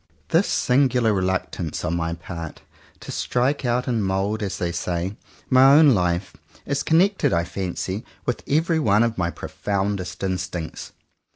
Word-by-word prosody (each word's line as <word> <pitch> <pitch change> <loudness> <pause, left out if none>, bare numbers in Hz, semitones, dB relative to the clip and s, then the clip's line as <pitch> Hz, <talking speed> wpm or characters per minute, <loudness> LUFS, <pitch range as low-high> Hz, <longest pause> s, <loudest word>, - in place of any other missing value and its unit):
This - - +3
singular 125 -4 +2
reluctance 95 -4 -2
on 85 - 0
my 85 -1 -1
part 85 -1 -8 0.4
to - - -7
strike 130 +3 0
out 120 +1 0
and 115 -4 0
mould, 95 +3 -1
as 95 -4 -3
they 85 -1 -1
say, 85 +3 -3 0.3
my 135 +2 +6
own 150 -3 +7
life, 90 0 0 0.3
is 140 0 -1
connected 190 +5 +3
I 85 0 +2
fancy 95 +2 -4 0.2
with 120 - -1
every 160 +3 +2
one 110 -5 +3
of 115 -4 -1
my 85 -1 +1
profoundest 100 +1 -3
instincts. 90 -3 -4
100 Hz, 150 wpm, -23 LUFS, 90-125 Hz, 0.4 s, own